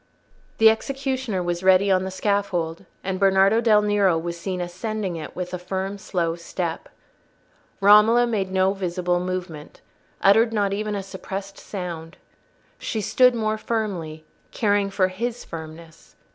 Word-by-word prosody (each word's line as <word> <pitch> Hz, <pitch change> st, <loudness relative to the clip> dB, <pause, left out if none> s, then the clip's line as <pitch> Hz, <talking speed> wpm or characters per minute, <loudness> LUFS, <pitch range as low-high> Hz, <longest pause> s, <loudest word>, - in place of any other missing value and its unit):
The 220 Hz, 0 st, +7 dB
executioner 260 Hz, -4 st, -2 dB
was 175 Hz, 0 st, -2 dB
ready 190 Hz, +1 st, +4 dB
on 185 Hz, 0 st, +2 dB
the -, -, -3 dB
scaffold, 190 Hz, -4 st, -1 dB, 0.2 s
and 190 Hz, -1 st, -3 dB
Bernardo 195 Hz, +3 st, +4 dB
del 215 Hz, -3 st, +4 dB
Nero 205 Hz, -4 st, +3 dB
was 170 Hz, +1 st, -4 dB
seen 180 Hz, +2 st, -4 dB
ascending 185 Hz, +2 st, -4 dB
it 160 Hz, -2 st, -7 dB
with 180 Hz, 0 st, -5 dB
a 180 Hz, -, -3 dB
slow 190 Hz, -1 st, -3 dB
firm -, -, -9 dB
step. 170 Hz, -1 st, -4 dB, 0.9 s
Romola 210 Hz, +4 st, +6 dB
made 205 Hz, -5 st, -2 dB
no 190 Hz, 0 st, +2 dB
visible 180 Hz, -2 st, -1 dB
movement, 180 Hz, -4 st, -6 dB, 0.4 s
uttered 220 Hz, +4 st, +5 dB
not 200 Hz, -2 st, +1 dB
even 210 Hz, +1 st, -2 dB
a 200 Hz, -, -3 dB
suppressed 195 Hz, +1 st, -7 dB
sound: 175 Hz, -3 st, -7 dB, 0.6 s
she 220 Hz, -, -3 dB
stood 250 Hz, +4 st, +4 dB
more 215 Hz, -1 st, -1 dB
firmly, 180 Hz, -10 st, -3 dB, 0.2 s
caring 205 Hz, -2 st, +1 dB
for 190 Hz, -1 st, +1 dB
his 235 Hz, +6 st, -4 dB
firmness. 160 Hz, 0 st, -10 dB
195 Hz, 145 wpm, -23 LUFS, 180-210 Hz, 0.9 s, The